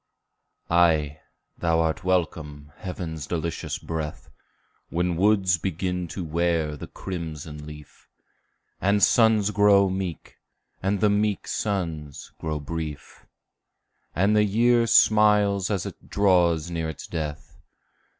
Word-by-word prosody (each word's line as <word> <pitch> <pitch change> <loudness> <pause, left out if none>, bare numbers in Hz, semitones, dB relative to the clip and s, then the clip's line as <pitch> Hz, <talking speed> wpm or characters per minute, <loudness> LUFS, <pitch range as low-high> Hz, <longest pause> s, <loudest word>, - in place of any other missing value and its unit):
Ay, 80 -3 +3 0.4
thou 80 -1 +1
art 80 -1 0
welcome, 80 -5 -2
heaven's 85 -6 -6
delicious 85 -1 -3
breath, 80 -2 -6 0.6
When 90 +1 0
woods 95 -1 +3
begin 90 0 -2
to 90 +3 -5
wear 80 -1 0
the - - -8
crimson 80 -4 -7
leaf, 75 -1 -13 0.7
And 100 +1 +2
suns 110 -3 +4
grow 100 -2 +4
meek, 95 -4 -5 0.4
and 100 +1 0
the 105 -1 +4
meek 105 -1 0
suns 80 -9 -3
grow 80 -1 -3
brief, 75 -1 -7 0.9
And 100 +4 +3
the 105 - +5
year 115 +3 +3
smiles 105 -3 +4
as 100 -4 -1
it - - -10
draws 90 -5 +2
near 80 -2 -2
its 80 - -8
death. 80 +1 -6
85 Hz, 115 wpm, -25 LUFS, 80-100 Hz, 0.9 s, the